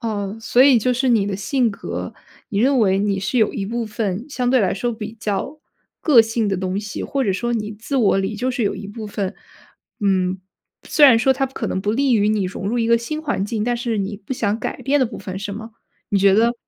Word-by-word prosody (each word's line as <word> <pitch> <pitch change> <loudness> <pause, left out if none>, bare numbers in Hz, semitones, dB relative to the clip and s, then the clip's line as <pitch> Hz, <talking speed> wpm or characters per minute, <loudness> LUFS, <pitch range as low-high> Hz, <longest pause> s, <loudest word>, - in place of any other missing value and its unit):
哦， 210 -2 -3
所 240 +3 +4
以 270 -4 +6
就 250 +3 +1
是 255 +1 0
你 215 -4 +3
的 195 -2 -2
性 240 +3 +1
格， 200 - -6 0.3
你 200 -4 -2
认 265 +3 +3
为 195 -3 +3
你 200 -1 0
是 195 +6 -2
有 215 -2 +3
一 195 - -3
部 235 +2 -2
分 215 +1 -3
相 250 -2 -1
对 260 0 +4
来 190 -3 +1
说 240 +5 -2
比 215 0 -6
较 215 +9 -3 0.4
个 265 -8 +6
性 225 -1 -1
的 195 - 0
东 190 +2 -2
西， 205 -1 -6
或 275 -1 -1
者 205 - +1
说 240 +5 -2
你 215 -2 -2
自 225 +6 -4
我 215 -7 +3
里 195 +3 -2
就 250 +5 -1
是 245 -2 -2
有 200 - 0
一 200 +1 -7
部 215 +1 -7
分， 200 -2 -3 0.7
嗯， 190 -2 +1 0.5
虽 295 - +5
然 245 -5 +8
说 265 +3 +3
它 270 - 0
可 265 - -5
能 190 - -2
不 210 +1 0
利 265 0 +2
于 210 0 +3
你 210 -3 +1
融 185 +1 -5
入 235 +4 0
一 230 - +1
个 235 0 +5
新 305 +7 -4
环 285 -10 -1
境， 210 0 -2
但 240 +1 0
是 235 -3 -2
你 200 +1 -3
不 205 +5 -7
想 220 -3 -1
改 - - -4
变 285 +2 +1
的 260 - +3
部 225 -2 -6
分 190 0 -6
是 200 0 -5
吗？ 220 +2 -8 0.4
你 200 -3 +2
觉 195 0 +5
得， 235 +3 +3
220 Hz, 270 characters per minute, -21 LUFS, 200-245 Hz, 0.7 s, 然